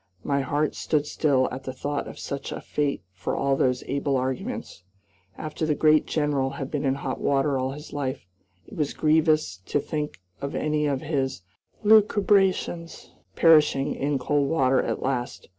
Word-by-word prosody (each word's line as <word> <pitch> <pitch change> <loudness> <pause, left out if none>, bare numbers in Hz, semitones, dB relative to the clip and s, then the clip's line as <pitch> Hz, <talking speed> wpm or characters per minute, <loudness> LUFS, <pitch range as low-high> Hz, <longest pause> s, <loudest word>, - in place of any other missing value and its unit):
My 140 -1 +1
heart 145 +2 0
stood 150 -2 0
still 140 -3 +2
at 130 +1 -7
the 130 - -3
thought 145 +2 -3
of - - -9
such 140 0 -5
a - - -4
fate 145 - -2
for - - -3
all 140 0 +1
those 125 -1 +1
able 140 0 0
arguments. 130 0 -4 0.6
After 155 +1 -5
the 155 -1 +2
great 155 +1 +4
General 145 -3 0
had 135 - -5
been 145 -1 -2
in 135 0 +2
hot 140 - -4
water 140 0 +2
all 130 +1 -2
his 150 +2 -10
life, 135 -3 -3 0.4
it - - -12
was 150 -3 -1
grievous 155 - +2
to - - +1
think 150 - -4 0.2
of 140 - -4
any 150 -1 0
of 135 -2 -1
his 135 - -2 0.4
lucubrations 200 -5 +3 0.2
perishing 150 -4 +4
in 140 +1 -1
cold 140 +2 +1
water 135 -4 +3
at - - -3
last. 125 -2 -3
145 Hz, 170 wpm, -25 LUFS, 135-155 Hz, 0.6 s, great